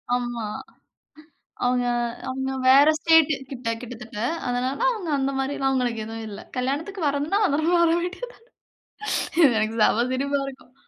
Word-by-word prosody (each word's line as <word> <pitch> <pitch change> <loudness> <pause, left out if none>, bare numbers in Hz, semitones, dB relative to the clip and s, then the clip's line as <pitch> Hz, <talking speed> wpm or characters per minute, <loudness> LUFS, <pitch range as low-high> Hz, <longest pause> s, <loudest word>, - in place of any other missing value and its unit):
ஆமா. 240 -2 -3 1.2
அவுங்க 245 0 +2 0.4
அவுங்க 265 +1 -3 0.2
வேற 275 +2 +7
ஸ்டேட்டு 320 -1 +5 0.2
கிட்ட 250 -3 -5
கிட்டதெட்ட. 245 -3 -9 0.3
அதனால 250 +2 -1
அவங்க 420 -8 -4
அந்த 270 0 0
மாதிரிலாம் 270 0 -1
அவுங்களுக்கு 245 -4 -1
எதுவும் 225 0 -6
இல்ல. 200 - -8 0.2
கல்யாணத்துக்கு 295 +10 -2
வரணும்னா, 290 +9 0
அவுங்கலாம் 335 +1 +2
வர 335 - +4
வேண்டியது 375 +8 -5
தான். - - -23 1.1
எனக்குச் 220 0 0
செம 235 +3 +3
சிரிப்பா 280 +2 0
இருக்கும். 260 -1 -11
265 Hz, 130 wpm, -24 LUFS, 245-310 Hz, 1.2 s, வேற